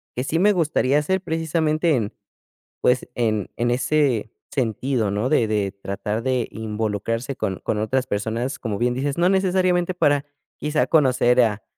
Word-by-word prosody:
que 125 - -1
sí 160 +4 0
me 205 +3 +5
gustaría 150 -5 +2
hacer 190 +5 0
precisamente 160 -1 0
en, 110 -5 -2 0.7
pues, 125 0 +2
en 110 -4 0
en 120 0 +1
ese 130 -3 +1 0.2
sentido, 120 -3 -1
¿no?, 105 +5 -1
de 130 -5 +3
de 105 -3 -1
tratar 100 +2 -4
de 130 -2 0
involucrarse 110 +3 -3
con 95 -4 -3
con 105 - -2
otras 130 +5 0
personas, 115 +6 -2
como 105 -4 -3
bien 120 +1 +1
dices, 140 +2 -2
no 175 +1 +4
necesariamente 185 -2 +2
para 145 -4 +2 0.3
quizás 150 +1 0
conocer 130 -5 +4
a 105 -3 0
125 Hz, 160 wpm, -22 LUFS, 110-155 Hz, 0.7 s, me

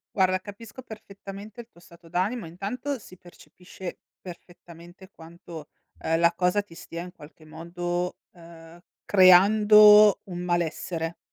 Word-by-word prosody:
Guarda 185 -1 +1
capisco 205 +5 -12
perfettamente 205 -1 -11
il 235 - -12
tuo 170 - -22
stato 170 0 -19
d'animo, 185 +6 -2
intanto 225 - -5
si 185 -3 -16
percepisce, 180 +1 -12 0.2
perfettamente 175 0 -14
quanto, 165 -1 -12 0.3
uhm, 165 0 -1
la 170 0 +3
cosa 180 +3 0
ti 200 - -18
stia 170 0 -9
in 180 0 -11
qualche 155 -1 -17
modo, 175 +3 -5 0.2
uhm, 165 -1 -16 0.2
creando 210 +2 +6
un 175 -2 -8
malessere; 170 -1 -3
180 Hz, 125 wpm, -25 LUFS, 170-205 Hz, 0.3 s, creando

